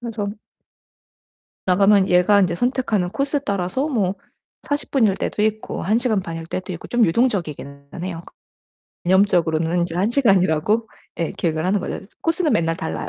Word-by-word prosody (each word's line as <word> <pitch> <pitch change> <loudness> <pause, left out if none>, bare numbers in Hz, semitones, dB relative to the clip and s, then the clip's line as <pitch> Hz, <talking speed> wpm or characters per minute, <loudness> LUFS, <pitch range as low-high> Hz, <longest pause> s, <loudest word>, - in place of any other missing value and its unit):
그래서 225 -4 -4 1.4
나가면 195 +1 +4
얘가 180 +3 +5
인제 180 -3 +1
선택하는 230 -3 0
코스 275 +6 -1
따라서 200 - -1
뭐 205 -9 0 0.5
40 290 0 -2
분일 225 -8 +3
때도 210 - -2
있고, 215 0 -2
1 215 +5 +2
시간 235 -4 +1
반일 165 -2 -6
때도 185 +2 -5
있고 165 - -9
좀 240 -1 +3
유동적이기는 165 - -1
해요. 175 -2 -5 0.8
개념적으로는 175 -3 +2
인제 170 -1 -2
1 195 +5 +1
시간이라고 205 - +2 0.3
예 165 - -1
계획을 160 -2 -2
하는 195 +2 +1
거죠. - - -4 0.2
코스는 330 -1 +1
맨날 165 0 +1
달라요, 80 - -4
195 Hz, 330 characters per minute, -21 LUFS, 170-230 Hz, 1.4 s, 얘가